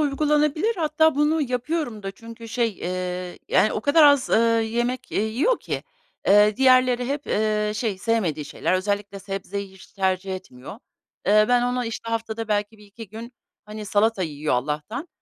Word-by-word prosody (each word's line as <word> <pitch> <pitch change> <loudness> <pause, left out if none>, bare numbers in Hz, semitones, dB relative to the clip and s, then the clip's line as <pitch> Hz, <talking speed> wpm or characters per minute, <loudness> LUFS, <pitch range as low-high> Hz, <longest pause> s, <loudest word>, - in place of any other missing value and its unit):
uygulanabilir. 300 +7 +1
Hatta 315 -1 +2
bunu 300 +2 +2
yapıyorum 250 -2 -3
da 195 - -4
çünkü 230 +2 -11
şey, 235 0 +1
eee, 180 0 -4
yani, 215 - +3
o - - -2
kadar 285 +6 +4
az, 285 -2 +5
ııı, 230 0 +3
yemek, 240 +3 -2
eee, - - +1
yiyor 265 - +1
ki, - - -4 0.4
eee, 210 +1 +5
diğerleri 255 -2 +4
hep, 285 +1 -3
eee, 210 0 0
şey, 215 -4 -2
sevmediği 190 -10 -1
şeyler. - - -2
Özellikle 200 +1 -2
sebzeyi 195 0 -5
hiç 190 - -15
tercih 190 -1 -1
etmiyor. 185 - -10 0.5
Eee, 215 +1 +5
ben 245 0 +4
ona 245 0 -1
işte 230 0 -5
haftada 225 0 -3
belki 210 +1 -1
1-2 210 +1 -12
gün, 230 +4 -9 0.3
hani, 215 0 -8
salata 210 0 +1
yiyor 150 -3 -2
Allah'tan. 150 - -3
225 Hz, 160 wpm, -23 LUFS, 200-255 Hz, 0.5 s, az